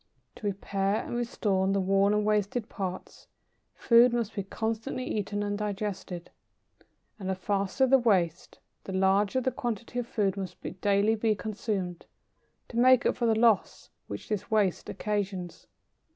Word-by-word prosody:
To 210 Hz, -, -4 dB
repair 200 Hz, +1 st, -1 dB
and -, -, -5 dB
restore 205 Hz, -5 st, 0 dB
the 195 Hz, 0 st, +2 dB
worn 195 Hz, +1 st, +3 dB
and 210 Hz, 0 st, +1 dB
wasted 210 Hz, +2 st, 0 dB
parts, 185 Hz, -2 st, -6 dB, 0.5 s
food 235 Hz, 0 st, +5 dB
must 230 Hz, -2 st, -1 dB
be 200 Hz, -, -2 dB
constantly 225 Hz, +6 st, -3 dB
eaten 205 Hz, -2 st, -2 dB
and 205 Hz, 0 st, -1 dB
digested. 200 Hz, -4 st, -4 dB, 0.9 s
And 190 Hz, -2 st, -4 dB
the 190 Hz, -, 0 dB
faster 200 Hz, +6 st, 0 dB
the 265 Hz, +1 st, +5 dB
waste, 185 Hz, -8 st, +1 dB, 0.3 s
the 190 Hz, -, -5 dB
larger 195 Hz, +6 st, +2 dB
the 260 Hz, -, 0 dB
quantity 240 Hz, 0 st, -4 dB
of 240 Hz, -, -4 dB
food 200 Hz, -4 st, 0 dB
which 190 Hz, -2 st, -5 dB
must 185 Hz, -, -8 dB
daily 205 Hz, +1 st, +3 dB
be 220 Hz, 0 st, +1 dB
consumed, 195 Hz, -3 st, -4 dB, 0.6 s
to 230 Hz, -, -6 dB
make 255 Hz, 0 st, +6 dB
up -, -, +2 dB
for 240 Hz, -, 0 dB
the 220 Hz, -1 st, +3 dB
loss 225 Hz, -3 st, +2 dB, 0.2 s
which 100 Hz, -, -7 dB
this 210 Hz, -1 st, -3 dB
waste 210 Hz, -5 st, +1 dB
occasions. 195 Hz, -4 st, -3 dB
205 Hz, 155 wpm, -28 LUFS, 195-225 Hz, 0.9 s, make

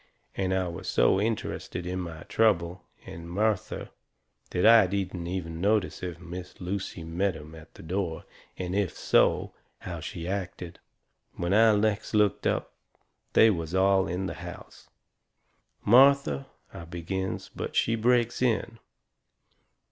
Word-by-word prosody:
And 95 Hz, -1 st, -1 dB
I 95 Hz, -1 st, +1 dB
was 85 Hz, -, -7 dB
so 95 Hz, +11 st, +3 dB
interested 105 Hz, -5 st, -3 dB
in 90 Hz, +1 st, -3 dB
my 85 Hz, -2 st, -6 dB
trouble 90 Hz, -6 st, +1 dB, 0.2 s
and 85 Hz, +1 st, -9 dB
Martha 105 Hz, +2 st, -1 dB, 0.6 s
that 90 Hz, -, 0 dB
I 110 Hz, -3 st, +8 dB
didn't 90 Hz, -2 st, -3 dB
even 85 Hz, -2 st, -4 dB
notice 100 Hz, -1 st, +1 dB
if 90 Hz, -2 st, -5 dB
Miss 90 Hz, +1 st, -9 dB
Lucy 95 Hz, -1 st, -4 dB
met 85 Hz, +3 st, -1 dB
'em 80 Hz, 0 st, -11 dB
at 80 Hz, -1 st, -14 dB
the -, -, -12 dB
door, 85 Hz, -1 st, -3 dB, 0.3 s
and 90 Hz, -1 st, -4 dB
if 100 Hz, -3 st, -1 dB
so, -, -, +2 dB, 0.3 s
how 85 Hz, -2 st, -6 dB
she 85 Hz, +1 st, -6 dB
acted. 90 Hz, -3 st, -5 dB, 0.6 s
When 85 Hz, +1 st, -1 dB
I 110 Hz, 0 st, +6 dB
next 105 Hz, +1 st, 0 dB
looked 105 Hz, -2 st, +2 dB
up -, -, -1 dB, 0.6 s
they 110 Hz, -, +7 dB
was 85 Hz, -2 st, -3 dB
all 95 Hz, 0 st, +3 dB
in 90 Hz, +3 st, -2 dB
the 85 Hz, -, -3 dB
house. 90 Hz, 0 st, -11 dB, 1.0 s
"Martha 125 Hz, -, +5 dB
" -, -, -33 dB
I 85 Hz, -, -8 dB
begins. 90 Hz, +3 st, -4 dB
But -, -, -5 dB
she 115 Hz, -, +2 dB
breaks 120 Hz, +1 st, +2 dB
in. 115 Hz, -1 st, 0 dB
95 Hz, 145 wpm, -28 LUFS, 85-105 Hz, 1.0 s, I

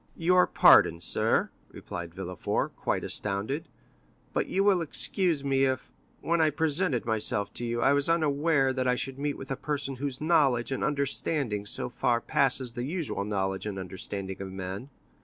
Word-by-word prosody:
"Your 180 Hz, +2 st, +4 dB
pardon, 85 Hz, -, +6 dB
sir," 85 Hz, -, +2 dB, 0.2 s
replied -, -, -8 dB
Villefort, -, -, -3 dB
quite -, -, -2 dB
astounded, 105 Hz, +11 st, -1 dB, 0.7 s
"but -, -, 0 dB
you 195 Hz, -, +1 dB
will 195 Hz, -3 st, +4 dB
excuse 165 Hz, -1 st, +1 dB
me 135 Hz, -1 st, +2 dB
if, 130 Hz, -1 st, -2 dB, 0.3 s
when 170 Hz, 0 st, +1 dB
I 160 Hz, -, +4 dB
presented 155 Hz, -2 st, 0 dB
myself 110 Hz, -2 st, -1 dB
to 120 Hz, -, 0 dB
you, 120 Hz, 0 st, -2 dB
I 140 Hz, -, +5 dB
was 145 Hz, +2 st, +1 dB
unaware 150 Hz, -3 st, +2 dB
that 130 Hz, 0 st, -1 dB
I 125 Hz, -, +3 dB
should 135 Hz, +1 st, -5 dB
meet 145 Hz, 0 st, -2 dB
with 135 Hz, 0 st, -8 dB
a -, -, 0 dB
person 140 Hz, -1 st, -3 dB
whose 135 Hz, -1 st, -4 dB
knowledge 140 Hz, -7 st, +2 dB
and 135 Hz, -, -2 dB
understanding 140 Hz, -6 st, -1 dB
so -, -, -2 dB
far 120 Hz, -1 st, 0 dB
surpass 140 Hz, +1 st, +2 dB
the 120 Hz, +1 st, -5 dB
usual 150 Hz, -, -3 dB
knowledge 95 Hz, -1 st, -2 dB
and 100 Hz, -2 st, -4 dB
understanding 95 Hz, +1 st, -6 dB
of 95 Hz, -1 st, -6 dB
men. 95 Hz, +6 st, -6 dB
135 Hz, 170 wpm, -28 LUFS, 110-150 Hz, 0.7 s, pardon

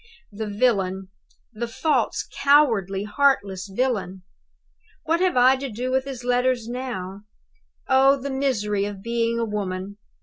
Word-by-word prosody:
"The 215 Hz, +1 st, -5 dB
villain 195 Hz, -4 st, 0 dB, 0.4 s
the 235 Hz, +2 st, -4 dB
false, 260 Hz, +1 st, 0 dB
cowardly, 230 Hz, -10 st, +3 dB
heartless 205 Hz, -5 st, +1 dB
villain 195 Hz, -6 st, -2 dB, 0.8 s
what 330 Hz, +2 st, +1 dB
have 365 Hz, -6 st, +1 dB
I 255 Hz, +2 st, +6 dB
to 270 Hz, 0 st, -5 dB
do 250 Hz, +3 st, -4 dB
with 265 Hz, 0 st, +1 dB
his 260 Hz, -3 st, -7 dB
letters 245 Hz, -1 st, +1 dB
now? 235 Hz, -6 st, -5 dB, 0.7 s
Oh, 270 Hz, +1 st, +4 dB
the 275 Hz, +1 st, -5 dB
misery 210 Hz, -7 st, 0 dB
of 200 Hz, -1 st, -7 dB
being 235 Hz, 0 st, 0 dB
a 230 Hz, -, 0 dB
woman! 200 Hz, -1 st, -4 dB
235 Hz, 135 wpm, -23 LUFS, 200-265 Hz, 0.8 s, I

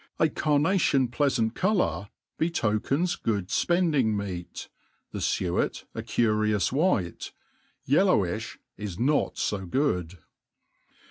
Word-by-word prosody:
A 160 Hz, -, +3 dB
carnation 150 Hz, -3 st, +2 dB
pieaTant 120 Hz, -4 st, +1 dB
colpvir 185 Hz, -, 0 dB, 0.3 s
betokena 155 Hz, +2 st, 0 dB
^oojd 100 Hz, -5 st, -1 dB
fpendiflg 170 Hz, -6 st, +2 dB
meal, 100 Hz, -5 st, -4 dB, 0.4 s
the -, -, -5 dB
fuet 90 Hz, -1 st, -1 dB
a -, -, -4 dB
curioua 110 Hz, -3 st, +1 dB
white 135 Hz, -, 0 dB, 0.3 s
| -, -, -39 dB
yi^ilpwiih -, -, +2 dB, 0.2 s
is 100 Hz, -5 st, -6 dB
not 140 Hz, +6 st, +1 dB
fo 100 Hz, -2 st, -1 dB
good. 90 Hz, -, -1 dB
120 Hz, 105 wpm, -27 LUFS, 100-150 Hz, 0.4 s, A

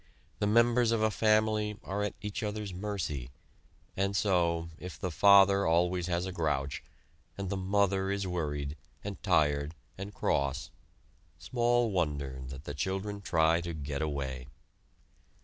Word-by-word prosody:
The 105 Hz, -, +1 dB
members 115 Hz, +2 st, +4 dB
of 115 Hz, -1 st, +1 dB
a 110 Hz, -, +3 dB
family 110 Hz, -1 st, +2 dB
are 100 Hz, +2 st, -3 dB
at 105 Hz, -, -2 dB
each 105 Hz, -1 st, -3 dB
other's 105 Hz, -2 st, -3 dB
mercy; 90 Hz, -10 st, -3 dB, 0.7 s
and 100 Hz, +1 st, 0 dB
so, 85 Hz, -4 st, +1 dB
if 90 Hz, -1 st, -7 dB
the 90 Hz, -, -2 dB
"father" 100 Hz, +2 st, +6 dB
always 90 Hz, +2 st, +2 dB
has 90 Hz, 0 st, 0 dB
a 95 Hz, -, -4 dB
grouch, 75 Hz, -6 st, -1 dB, 0.6 s
and 100 Hz, -1 st, -4 dB
the -, -, 0 dB
"mother" 95 Hz, 0 st, +1 dB
is 100 Hz, 0 st, -1 dB
worried, 75 Hz, -5 st, -2 dB, 0.3 s
and -, -, -6 dB
tired, 75 Hz, 0 st, +2 dB, 0.2 s
and 100 Hz, +1 st, -5 dB
cross, 70 Hz, -9 st, -1 dB, 0.7 s
small 120 Hz, -1 st, +1 dB
wonder 70 Hz, -7 st, -1 dB
that 65 Hz, +2 st, -8 dB
the 75 Hz, -, -5 dB
children 95 Hz, +7 st, -3 dB
try 85 Hz, -2 st, +3 dB
to 85 Hz, -1 st, -5 dB
get 70 Hz, -1 st, -4 dB
away. 70 Hz, -4 st, -3 dB
95 Hz, 145 wpm, -31 LUFS, 75-105 Hz, 0.7 s, father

